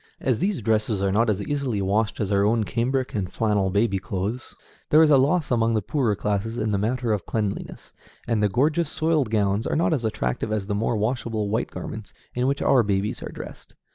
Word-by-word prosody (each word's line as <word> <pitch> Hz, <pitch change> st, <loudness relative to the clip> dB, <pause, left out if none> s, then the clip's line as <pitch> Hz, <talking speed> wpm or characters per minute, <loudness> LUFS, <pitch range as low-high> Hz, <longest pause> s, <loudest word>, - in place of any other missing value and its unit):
As 125 Hz, -4 st, 0 dB
these 190 Hz, -, -1 dB
dresses 110 Hz, -2 st, +1 dB
are 100 Hz, -, +1 dB
not 110 Hz, +3 st, +2 dB
as 105 Hz, -1 st, 0 dB
easily 140 Hz, -6 st, -2 dB
washed 105 Hz, +3 st, 0 dB
as 105 Hz, -2 st, -1 dB
our 100 Hz, 0 st, +3 dB
own 110 Hz, +2 st, +2 dB
cambric 125 Hz, +4 st, -1 dB
and 95 Hz, -4 st, -2 dB
flannel 105 Hz, -4 st, +1 dB
baby 100 Hz, 0 st, +1 dB
clothes, 100 Hz, +7 st, -4 dB, 0.3 s
there 155 Hz, +2 st, +6 dB
is 155 Hz, -, +4 dB
a 140 Hz, -, +7 dB
loss 150 Hz, +3 st, +1 dB
among 115 Hz, -1 st, +2 dB
the 110 Hz, -, +1 dB
poorer 120 Hz, -3 st, 0 dB
classes 105 Hz, +3 st, -2 dB
in 110 Hz, -2 st, -1 dB
the 100 Hz, -, +1 dB
matter 120 Hz, +2 st, 0 dB
of 100 Hz, -4 st, -3 dB
cleanliness; 105 Hz, -3 st, -4 dB, 0.3 s
and 115 Hz, -3 st, +1 dB
the 105 Hz, -, +3 dB
gorgeous 150 Hz, -, +1 dB
soiled 155 Hz, -5 st, +1 dB
gowns 105 Hz, 0 st, +1 dB
are -, -, -1 dB
not 165 Hz, +1 st, +2 dB
as 135 Hz, -6 st, -1 dB
attractive 105 Hz, -, -2 dB
as 105 Hz, -2 st, -1 dB
the 105 Hz, -, -2 dB
more 110 Hz, +2 st, 0 dB
washable 110 Hz, -1 st, -1 dB
white 110 Hz, +3 st, -1 dB
garments 110 Hz, -1 st, -8 dB, 0.2 s
in 125 Hz, +1 st, 0 dB
which 140 Hz, +1 st, 0 dB
our 130 Hz, -, +5 dB
babies 100 Hz, -1 st, -1 dB
are -, -, -6 dB
dressed. -, -, -10 dB
110 Hz, 215 wpm, -24 LUFS, 100-125 Hz, 0.3 s, a